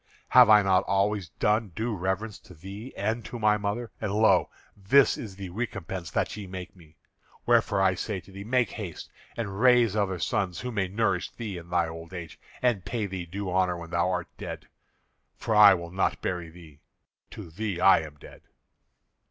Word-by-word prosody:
Have 125 -3 +7
I 105 -1 +7
not 95 -1 +3
always 100 -2 0
done 105 0 0
due 110 0 -2
reverence 95 +3 -3
to 90 - -16
thee 100 +9 -9
and 110 +3 -1
to 120 - -6
my 105 -2 +3
mother? 105 +3 -3
And, 105 -3 -2
lo! 110 +2 +3 0.3
this 110 +8 +4
is 105 -5 -8
the 95 -2 -7
recompense 95 -5 -5
that - - -1
ye 105 -2 -7
make 90 0 -8
me. 80 -3 -19 0.5
Wherefore 100 -1 +3
I 95 -1 +4
say 95 +2 -4
to 95 - -17
thee, 100 +1 -8
make 125 +2 +1
haste 95 -7 -7 0.3
and 100 -4 -4
raise 125 -4 +5
other 100 -3 0
sons 95 -1 -2
who 125 - -4
may 100 -4 -1
nourish 100 -2 0
thee 105 -6 -6
in 85 0 -14
thy 85 -1 +1
old 80 +2 -9
age, 85 -3 -8 0.2
and 120 -7 +2
pay 110 +3 -3
thee 90 -3 -5
due 95 +2 -5
honour 90 -1 +1
when 85 -1 -9
thou 85 +1 +1
art 90 -1 -3
dead, - - -7 0.7
for 110 - -2
I 105 -2 +9
will 85 -1 -7
not 95 +1 0
bury 90 -2 -3
thee. 80 -3 -15 0.5
To 80 - -10
thee 100 0 -3
I 95 - +6
am 80 -2 -8
dead." 75 - -14
95 Hz, 195 wpm, -27 LUFS, 90-110 Hz, 0.7 s, I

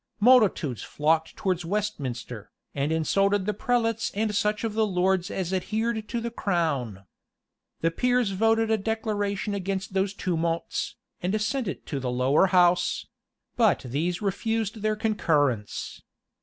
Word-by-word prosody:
Multitudes 210 - +4
flocked 160 +2 0
towards 185 -3 -1
Westminster, 130 - -3 0.2
and 140 +2 -1
insulted 195 +5 +2
the 210 - 0
prelates 230 +1 0
and 215 0 0
such 210 +1 0
of 225 -2 -1
the 220 0 +2
lords 185 -1 +1
as 190 -1 -3
adhered 220 +4 -1
to 235 - -1
the 235 0 -4
crown. 140 - -1 0.8
The 165 - +2
peers 245 +2 +1
voted 225 +3 +2
a 220 - +2
declaration 205 -1 -2
against 195 -1 -3
those 195 +1 0
tumults, 170 -3 -2 0.3
and 190 +5 0
sent 230 +2 -1
it 185 - -5
to 140 - -3
the 130 -1 -3
lower 130 +8 +3
house; 180 -1 +3 0.5
but 225 -5 +3
these 165 - -2
refused 220 +2 -1
their 215 0 +1
concurrence. 150 - 0
195 Hz, 140 wpm, -26 LUFS, 165-220 Hz, 0.8 s, Multitudes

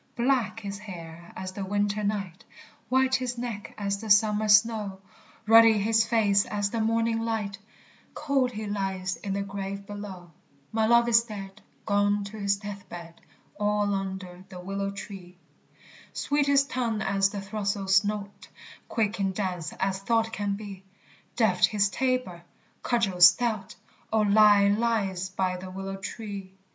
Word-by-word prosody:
_ - - -39
Black 235 -3 0
his 200 -1 -6
hair 170 -4 -10
as 185 0 -5
the 195 +1 -5
winter 205 +2 -1
night, 200 -4 -3 0.5
White 260 +1 +2
his 250 -2 0
neck 235 -4 -6
as 200 -1 -2
the 220 - -7
summer 210 +1 +4
snow, 210 -2 +3 0.5
Ruddy 225 0 +8
his 220 +2 +2
face 205 -4 +3
as 205 -1 -1
the 230 - -1
morning 225 +1 +1
light; 220 -3 -3 0.6
Cold 275 -4 +1
he 215 -1 -5
lies 195 -2 -2
in 195 - -4
the 200 0 -1
grave 200 0 -6
below. 195 -4 -8 0.4
My 220 0 +1
love 235 +1 +5
is 230 0 +4
dead, 200 -2 -9 0.3
etc. 200 -3 -2 3.0
Sweet 290 0 0
his 280 -1 +5
tongue 240 -5 -2
as 195 0 +2
the 200 0 -5
throstle's 195 -1 +1
note; 205 -1 -5 0.4
Quick 215 -2 -1
in 195 -1 0
dance 180 -4 -3
as 190 0 -2
thought 225 +2 0
can 205 -1 -2
be; 200 -2 -9 0.5
Deft 200 -7 +3
his 205 -2 +1
tabor, 255 -7 -1 0.4
cudgel 210 -7 0
stout; 215 +2 +5 0.4
O, 220 0 +3
lie 205 -1 +6
lies 200 -4 0
by 185 -1 -1
the 185 +1 -8
willow 195 +1 -6
tree! 195 -2 -7
205 Hz, 135 wpm, -27 LUFS, 195-225 Hz, 3.0 s, Ruddy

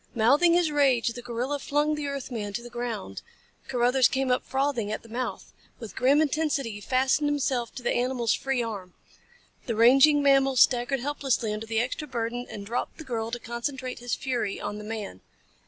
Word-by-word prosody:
Mouthing 280 +10 +4
his 345 -3 +2
rage, 270 -5 +3
the 245 +1 -7
gorilla 245 +4 -3
flung 295 +2 0
the 300 -1 -3
earth 280 -2 -5
man 205 -4 -4
to 235 - -4
the 240 - -10
ground. 235 - -5 0.5
Carruthers 250 0 +3
came 265 -1 -1
up 250 - +1
frothing 265 -6 -1
at 215 - -4
the 230 - -15
mouth. 245 +3 -5 0.2
With 220 -6 -9
grim 280 +4 +4
intensity 295 -4 -1
he 205 0 -8
fastened 265 +5 +1
himself 265 -5 -1
to 250 - -7
the - - +1
animal's 245 -2 +1
free 270 -3 -1
arm. 200 -6 -6 0.7
The 230 - -1
raging 275 +6 +6
mammal 270 -1 +4
staggered 245 +1 +3
helplessly 270 -5 -1
under 215 +1 -5
the 225 0 0
extra 255 +6 -2
burden 245 -1 -3
and 200 -1 -7
dropped 235 +4 -3
the 320 - -8
girl 230 -5 -3
to 240 - -3
concentrate 250 +2 -5
his 245 0 -2
fury 240 -7 -2
on 210 - -5
the - - -8
man. 210 - -6
245 Hz, 190 wpm, -27 LUFS, 230-275 Hz, 0.7 s, raging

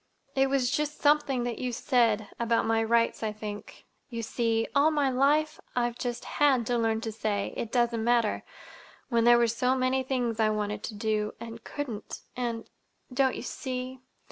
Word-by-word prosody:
It 270 0 +2
was 265 -2 +1
just 300 +1 -1
something 290 -4 +3
that 240 -1 -3
you 250 -1 -2
said—about 230 -2 +1
my 225 0 +2
rights, 230 +1 +2
I 220 -1 -1
think. 210 -1 -8 0.2
You 230 -2 -4
see—all 230 +6 +2
my 290 -4 +1
life 300 +4 +2 0.2
I've 240 -1 0
just 240 -1 -4
had 270 -5 +2
to 245 +1 +1
learn 225 -1 +1
to 225 - -3
say 210 -2 -2
'It 225 - -4
doesn't 235 -2 +1
matter,' 235 -2 +2 0.7
when 235 -2 +2
there 240 0 +7
were 235 - +4
so 250 +3 +1
many 260 0 +1
things 245 -3 -1
I 220 -1 +4
wanted 210 -1 -2
to 220 - -6
do, 210 0 -1
and 230 -1 -8
couldn't. 240 -8 -6
And—don't 250 +2 -3
you - - -6
see? 255 0 -5
240 Hz, 170 wpm, -28 LUFS, 225-260 Hz, 0.7 s, there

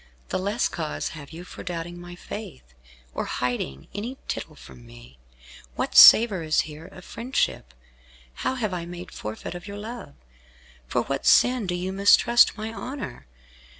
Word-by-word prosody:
The - - -1
less 205 +5 0
cause 155 -3 -4
have 145 -3 -10
you 170 +2 -9
for - - -10
doubting 175 0 -6
my 175 0 -10
faith, 65 - -9 0.4
or - - -3
hiding 120 - -3
any 230 +7 -5
tittle - - -5
from 65 -2 -14
me. - - -15 0.6
What - - -3
savour 215 -6 +9
is 155 -1 +2
here 155 +2 -9
of - - -13
friendship? 230 - -2 0.7
How 260 - 0
have 215 -6 -2
I 170 -2 -4
made 175 0 -9
forfeit 110 +8 -6
of 175 +2 -9
your 200 0 -7
love; 215 - -8 0.7
for - - 0
what - - -3
sin 245 -4 +4
do 175 - -1
you 185 +2 -3
mistrust 215 +5 +5
my 220 +1 -5
honour? 230 - -7
175 Hz, 160 wpm, -25 LUFS, 150-215 Hz, 0.7 s, savour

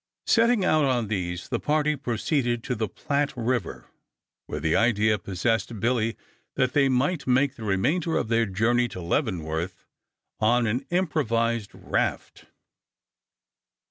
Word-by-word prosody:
Setting 230 -3 +3
out 155 -1 +3
on 125 -6 +1
these 90 -4 -3
the - - -1
party 150 0 +1
proceeded 120 -1 -1
to - - -2
the 110 -2 -2
Platte 140 +6 -2
River, 120 -4 -2 0.6
where 75 - -4
the 80 +2 +1
idea 110 -2 +3
possessed 105 +3 -1
Billy 115 0 0 0.4
that 130 -2 +1
they 140 -2 +4
might 140 +4 0
make 130 +2 +3
the 115 - -10
remainder 140 - +1
of - - -1
their 115 0 +2
journey 115 +6 +2
to 95 - -8
Leavenworth 85 - -2 0.5
on 120 +2 +3
an 120 +5 -1
improvised 115 - 0
raft. - - -2
120 Hz, 135 wpm, -25 LUFS, 105-140 Hz, 0.6 s, they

